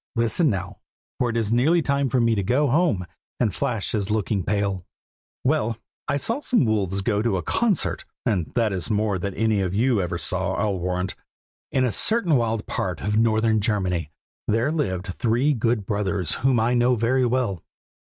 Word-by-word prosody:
Listen 115 +8 +2
now, 95 -2 -4 0.4
for 125 - +1
it 115 - -1
is 110 -1 0
nearly 150 +9 +4
time 140 -1 +1
for 125 - +1
me 115 -1 +3
to 105 - 0
go 130 +9 +2
home, 120 - +2 0.3
and 110 -6 +1
Flash 120 -8 -2
is 105 -2 -1
looking 105 -1 0
pale. 100 -2 -1 0.6
"Well, 125 -5 +1 0.3
I - - +1
saw 230 - -2
some 245 - +2
wolves 100 -3 0
go 105 0 +1
to 115 -4 +1
a 90 - -3
concert, 225 -8 0 0.2
and 95 -9 0
that 115 -4 +2
is 95 +3 -2
more 105 -3 0
than 100 +1 -4
any 110 -2 +1
of 95 0 -2
you 115 -1 +2
ever 90 -1 -2
saw, - - -1
I'll 100 -3 -1
warrant. 90 +1 -2 0.6
In 130 -1 +2
a 125 - 0
certain 215 - +2
wild 115 -3 0
part 90 -4 -3
of 105 +3 0
northern 110 -1 +2
Germany, 95 -7 -1 0.4
there 115 +7 +1
lived 95 - -1
three 120 +8 +1
good 115 -3 0
brothers 100 -4 -1
whom 130 -1 +3
I 115 +2 +2
know 125 +1 +3
very 125 +3 +2
well. 120 -8 -1
110 Hz, 185 wpm, -24 LUFS, 100-125 Hz, 0.6 s, nearly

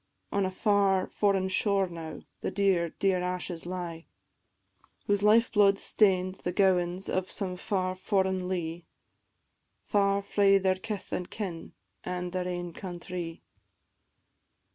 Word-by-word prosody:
On 200 -1 +1
a - - -2
far 195 -1 +2
foreign 195 -2 +1
shore 195 +1 +2
now, 165 -3 -7 0.2
the - - -2
dear, 190 -4 +2
dear 190 +2 +1
ashes 180 -1 -3
lie, 175 -2 -5 1.0
Whose 205 -1 +1
life 220 +3 +5
blood 200 -2 +5
stain'd 185 -3 +2
the 175 - -2
gowans 180 -1 +2
of 185 0 -1
some 185 -3 -2
far 185 -1 -1
foreign 190 -1 0
lea, 175 -2 -3 1.0
Far 200 -1 +2
frae 200 0 +4
their 190 -1 +2
kith 200 +1 -6
an' 180 - -2
kin, 180 -6 -6 0.3
an' 180 0 -3
their 180 0 -2
ain 175 -1 -4
countrie. 175 -2 -6
185 Hz, 130 wpm, -29 LUFS, 180-200 Hz, 1.0 s, life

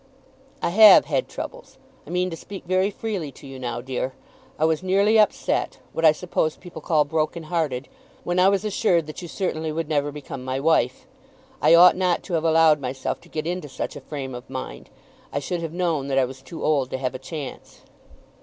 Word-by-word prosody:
"I - - +2
have 215 +2 +8
had - - -1
troubles. - - -8 0.3
I - - -10
mean 180 +1 0
to - - -4
speak 195 +4 -9
very 185 +2 +2
freely 200 -8 -4
to - - -15
you 135 -1 -9
now, 120 -1 -4
dear. 130 +1 -3 0.4
I 155 - +2
was 160 0 +1
nearly 200 +4 +3
upset, 210 - +1 0.2
what 165 - -3
I 160 - +8
suppose 155 -1 -1
people 175 -3 -10
call 150 -1 +2
broken 155 +2 -1
hearted, 155 -6 -2 0.4
when 175 +1 0
I 185 +1 +6
was 200 +1 0
assured 190 -5 +2
that 155 +3 -8
you 175 - -7
certainly 160 -3 -2
would 160 0 -3
never 145 -1 0
become 140 -3 -8
my 130 +1 -2
wife. 140 -4 +1 0.6
I 155 +3 +6
ought 175 +2 +8
not 180 -1 +1
to 185 - -7
have 165 -1 +1
allowed 160 -2 +5
myself 130 0 -3
to 170 - -19
get 155 -1 -4
into 175 -3 -3
such - - -5
a - - -8
frame 135 -3 -6
of 125 +1 -9
mind. 130 -1 -7 0.4
I - - -3
should 170 +5 -3
have 165 -2 -4
known 165 -5 -1
that 135 -1 -1
I 135 - +4
was 130 +1 -10
too 160 +5 -9
old 140 -4 +1
to 130 - -3
have 130 -1 -2
a 130 - -6
chance." 140 0 -8
160 Hz, 210 wpm, -24 LUFS, 135-180 Hz, 0.6 s, have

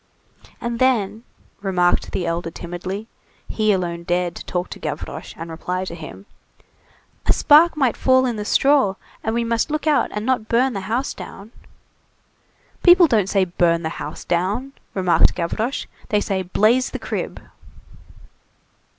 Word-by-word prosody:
"And 235 -1 -3
then," 225 -5 +2 0.4
remarked 180 -3 +1
the 180 - -2
elder 170 0 -2
timidly,—he 190 +5 -4
alone 175 -3 -1
dared 175 0 -1
talk 180 0 -2
to - - -7
Gavroche, - - -6
and 165 0 -7
reply 180 +3 -3
to 175 - -6
him, 170 +4 -9 1.0
"a - - +6
spark 315 +2 +5
might 260 -6 +2
fall 260 0 +3
in 245 -2 -1
the 210 - -4
straw, 270 -2 +3 0.3
and 220 - -1
we 235 - +1
must 230 +4 0
look 305 +1 -2
out 300 -2 +3
and 210 +1 -4
not 250 -4 0
burn 250 +3 +2
the 200 - -3
house 250 +5 -1
down." 205 +3 -10 1.3
"People 355 0 +8
don't 215 - +2
say 195 -1 +2
'burn 170 -1 +1
the 160 - -1
house - - -6
down,'" 205 +10 -1 0.2
remarked 185 -3 +3
Gavroche, 215 +9 -2 0.2
"they 210 - +3
say 195 -2 -1
'blaze 215 +7 +2
the - - -5
crib. - - -4
210 Hz, 150 wpm, -21 LUFS, 180-250 Hz, 1.3 s, People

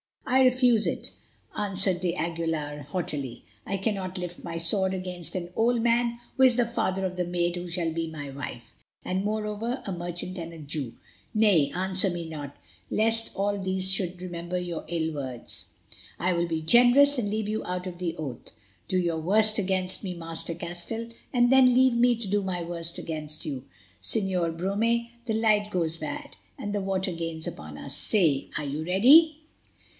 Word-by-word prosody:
"I 260 +1 +4
refuse 250 -3 +4
it," - - -2 0.4
answered 195 -3 0
d'Aguilar 165 -4 -2
haughtily. 145 -7 -3 0.2
"I 195 - -1
cannot 190 -2 -1
lift 175 -1 -6
my 165 -1 -4
sword 190 +3 +2
against 180 -2 -4
an 175 -2 -3
old 235 +1 +2
man 235 0 +2 0.2
who 265 - +5
is 255 -2 +6
the 245 -1 +3
father 220 -5 -1
of 185 -1 -3
the 180 - 0
maid 175 0 0
who 175 0 -5
shall 170 -1 -1
be 165 0 -2
my 145 -3 -6
wife, 135 -3 -7 0.3
and, 185 +1 -1
moreover, 215 +4 -2
a 195 - -3
merchant 175 +1 -4
and 170 0 -6
a - - -9
Jew. 145 -5 -3 0.4
Nay, 200 -9 +5
answer 190 +1 +1
me 170 -2 -4
not, 145 -3 -7 0.3
lest 225 +1 +2
all 200 +1 0
these 190 0 +1
should 185 -2 -1
remember 175 0 -4
your 175 -2 -4
ill 160 -1 -1
words. 130 -5 -6 0.5
I 180 +2 +1
will 170 0 0
be 160 -1 -2
generous, 250 - +6
and 205 -4 -1
leave 215 0 -2
you 215 +1 -1
out 180 0 -3
of 175 -1 -6
the 170 -2 -2
oath. 135 -7 -6 0.4
Do 185 - +1
your 170 -3 0
worst 215 +6 +3
against 185 -1 0
me, 185 -2 -4
Master 165 0 -3
Castell, 175 +8 -5 0.2
and 245 0 +4
then 260 -2 +6
leave 260 0 +5
me 240 +1 +4
to 225 -2 -6
do 205 +1 +1
my 185 -3 -2
worst 170 0 -3
against 155 -1 -5
you. 135 -4 -4 0.4
Señor 175 - 0
Brome, 230 +6 +1 0.2
the 220 - 0
light 215 -2 +3
grows 165 -4 -1
bad, 155 -2 -6 0.2
and 205 -1 -4
the 205 - 0
water 190 -1 -1
gains 165 -1 -4
upon 75 0 -7
us. 140 - -5
Say, 165 -10 +2
are 150 - -2
you 145 +3 -3
ready?" 275 - +6
185 Hz, 180 wpm, -27 LUFS, 165-215 Hz, 0.5 s, is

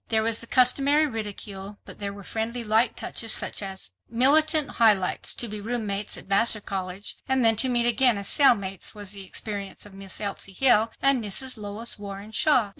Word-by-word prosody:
There 220 -1 +1
was 225 0 +2
the 230 - -6
customary 275 +5 +3
ridicule, 205 -4 -7
but - - -11
there 200 -1 -4
were 200 0 -11
friendly 230 +4 -4
light 220 +2 +1
touches 225 -1 -1
such - - +3
as, 190 - -6 0.2
"Militant 300 +5 +4
Highlights—To 215 +1 +1
be 210 -1 -7
roommates 210 -3 -4
at - - -10
Vassar 215 +3 +3
College 190 0 -6
and 265 -2 +2
then 225 0 +5
to 260 - +2
meet 240 -1 +1
again 240 -1 +4
as 200 - -3
cellmates 200 - +2
was 205 -2 -7
the 200 -1 -7
experience 200 0 -4
of 205 - -14
Miss 195 0 -7
Elsie 200 -1 -6
Hill 225 -1 +4
and 275 -3 +3
Mrs. 255 +6 -1
Lois 210 +1 -3
Warren 200 +1 -9
Shaw." 245 -3 +2
220 Hz, 185 wpm, -25 LUFS, 200-245 Hz, 0.2 s, then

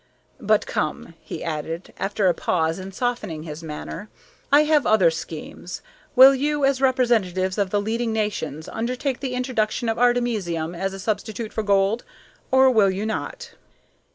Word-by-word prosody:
But 215 -3 +2
come," 155 +2 -3
he - - -7
added, 165 +2 -4
after 200 0 -1
a 180 - +5
pause 165 0 0
and 190 +1 -7
softening 205 -8 -3
his 155 0 -7
manner, 160 +6 -7 0.4
"I 290 +2 +7
have 300 -1 +2
other 190 -6 +5
schemes. 165 +2 -7 0.3
Will 265 +2 +9
you, 290 +1 0
as 270 -1 +1
representatives 215 -8 +1
of 200 -2 +1
the 205 - +1
leading 225 +3 -1
nations, 205 -9 -3
undertake 250 +3 -2
the 260 -2 -3
introduction 245 -2 -1
of 225 - -1
artemisium 215 -10 +1
as 195 +2 -3
a - - -8
substitute 215 +2 -3
for 220 - -1
gold, 200 +2 +2 0.5
or 265 0 +5
will 215 -5 +4
you 190 +3 -2
not?" 470 - -4
215 Hz, 155 wpm, -23 LUFS, 185-245 Hz, 0.5 s, Will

